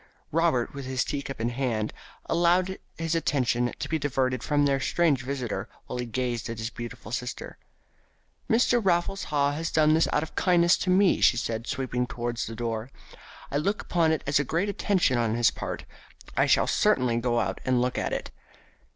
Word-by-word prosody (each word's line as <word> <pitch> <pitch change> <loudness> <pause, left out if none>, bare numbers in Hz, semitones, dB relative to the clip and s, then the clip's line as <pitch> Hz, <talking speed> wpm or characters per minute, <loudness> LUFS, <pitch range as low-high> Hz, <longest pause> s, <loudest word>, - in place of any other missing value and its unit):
Robert, 160 -7 +1
with 140 -1 -6
his 130 -2 0
teacup 140 -3 -4
in 115 +1 0
his 120 - -8
hand, 115 -5 -1 0.3
allowed 180 +2 +2 0.2
his 165 0 -1
attention 125 -7 +1
to - - -4
be 160 - -1
diverted 130 -2 0
from 145 -1 +2
their 140 -1 +2
strange 150 -2 +2
visitor 125 -2 -4 0.2
while 125 - -5
he 120 - -3
gazed 120 0 -2
at 115 - -5
his 110 +2 -4
beautiful 120 -2 -8
sister. 125 +1 -5 0.9
"Mr. 240 0 +3
Raffles 190 +1 +1
Haw 145 -1 +1
has 160 +3 -3
done 155 -1 +4
this 160 +1 +3
out 150 - +1
of 160 - -8
kindness 175 -1 +4
to 185 - -2
me," 185 +1 +4
she 120 - +5
said, 115 -1 -3
sweeping 125 -1 -2
towards 120 -1 -3
the 115 - -6
door. 115 0 -3 0.6
"I 140 - 0
look 200 +8 -1
upon 165 -2 +2
it 160 - -1
as 140 +1 +2
a - - +2
great 170 +8 -1
attention 185 -11 +1
on 115 -1 +1
his 120 -1 +4
part. - - -5 0.5
I - - +3
shall - - +4
certainly 120 -2 +2
go 120 0 +1
out - - -2
and 130 -1 +2
look 125 +1 0
at - - -2
it." - - -4
135 Hz, 195 wpm, -27 LUFS, 120-165 Hz, 0.9 s, she